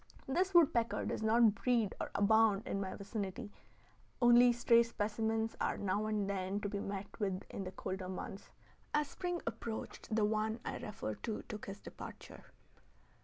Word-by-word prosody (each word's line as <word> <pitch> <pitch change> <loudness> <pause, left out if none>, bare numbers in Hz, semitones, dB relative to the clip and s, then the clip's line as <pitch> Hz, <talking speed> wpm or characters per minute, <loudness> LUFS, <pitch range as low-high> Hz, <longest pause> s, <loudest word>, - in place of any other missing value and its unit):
This 360 +7 +1
woodpecker 240 -9 +4
does - - -2
not 220 0 +5
breed 230 -2 +1
or - - -3
abound 220 0 +4
in 195 - -1
my 190 -1 -4
vicinity; 200 -1 -5 0.7
only 240 0 +7
stray 235 0 +5
specimens 220 0 -1
are - - +1
now 205 +2 0
and 210 -2 0
then 195 0 -1
to 205 - -2
be 200 0 -3
met 200 +2 -5
with 195 -3 -1
in 195 - -4
the 185 - -5
colder 185 -1 -5
months. 190 +1 -6 0.5
As 300 -1 +1
spring 355 +1 -3
approached, 225 -1 -4
the 215 -2 +3
one 220 +1 0
I - - -3
refer 205 - -4
to 220 - -4
took 210 -1 -7
his 200 +1 -6
departure. - - -10
215 Hz, 165 wpm, -35 LUFS, 200-235 Hz, 0.7 s, only